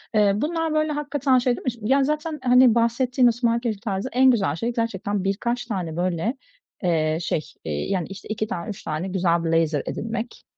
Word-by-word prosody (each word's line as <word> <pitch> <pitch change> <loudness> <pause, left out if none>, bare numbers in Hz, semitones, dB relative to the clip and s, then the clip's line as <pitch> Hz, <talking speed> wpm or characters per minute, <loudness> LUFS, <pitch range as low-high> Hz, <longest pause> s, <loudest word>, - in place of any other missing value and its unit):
Eee, 210 -2 +5
bunlar 320 +5 -1
böyle 310 0 +1
hakikaten 290 -3 +1
şey 250 0 +2
değil - - -9
mi, - - -9
işte 235 -2 -2
yani, 270 +5 +3
zaten, 300 +1 -2
hani 250 -2 +6
bahsettiğimiz 240 +1 +3
smart 235 -1 +1
casual 220 -5 -2
tarzı 200 +2 -2
en 260 +1 +5
güzel 195 -10 +1
şey 235 +7 -2
gerçekten 205 -4 -2
birkaç 235 +5 -1
tane, 185 -8 -3
böyle, 185 - -1 0.5
eee, 160 -3 +1
şey, 165 -2 -1 0.2
iii, 75 - -3
yani, 185 -4 -1
işte, 195 +1 -10
2 215 0 -2
tane, 175 -6 -5
3 205 - -7
tane 155 +4 -3
güzel 175 -3 +1
blazer 165 -3 +1
edinmek. 230 +1 -5
225 Hz, 195 wpm, -23 LUFS, 185-255 Hz, 0.5 s, hani